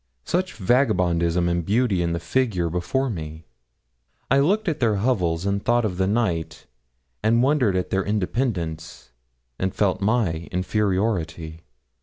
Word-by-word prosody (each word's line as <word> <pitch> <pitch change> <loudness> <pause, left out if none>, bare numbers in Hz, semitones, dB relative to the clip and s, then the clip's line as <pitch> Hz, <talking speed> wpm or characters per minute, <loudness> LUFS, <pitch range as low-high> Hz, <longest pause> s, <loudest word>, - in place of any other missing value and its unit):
Such 185 +2 -1
vagabondism 90 -7 +2
and 85 0 0
beauty 105 0 +1
in 85 -1 0
the 85 - -2
figure 90 -3 0
before 130 +10 -1
me! 80 -7 -6 0.9
I 135 - +5
looked 200 +9 +2
at 155 -2 -1
their 115 -4 +2
hovels 95 -6 0
and 100 0 -1
thought 120 0 +2
of 90 -4 -3
the 95 0 +1
night, 100 -7 -1 0.6
and 115 +2 +3
wondered 130 -8 +2
at 90 - -2
their 95 0 +1
independence, 85 - -3 0.5
and 95 0 -2
felt 95 -1 +1
my 100 -7 0
inferiority. 90 -4 -1
95 Hz, 140 wpm, -23 LUFS, 85-120 Hz, 0.9 s, I